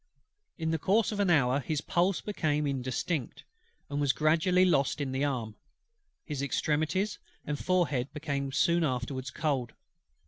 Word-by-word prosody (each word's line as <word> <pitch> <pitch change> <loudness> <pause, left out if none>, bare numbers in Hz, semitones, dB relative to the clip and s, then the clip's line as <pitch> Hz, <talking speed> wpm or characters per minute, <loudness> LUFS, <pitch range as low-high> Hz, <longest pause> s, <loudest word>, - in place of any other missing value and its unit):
In 160 -2 -1
the 160 - 0
course 210 +8 +2
of 210 - -4
an 200 -2 +2
hour 140 -5 +4
his 150 +2 -2
pulse 175 +4 +1
became 150 -7 -1
indistinct, 130 +1 -2 0.4
and 145 0 -2
was 140 -2 +3
gradually 165 +4 +3
lost 145 -5 +2
in 140 -2 -2
the 130 +2 -1
arm. 125 -7 -2 0.7
His 145 -4 -4
extremities 155 +8 0 0.3
and 145 0 -3
forehead 155 -8 +1
became 140 -2 -3
soon 170 +4 +2
afterwards 130 -1 -2
cold. 130 -3 -1
150 Hz, 145 wpm, -30 LUFS, 135-170 Hz, 0.7 s, hour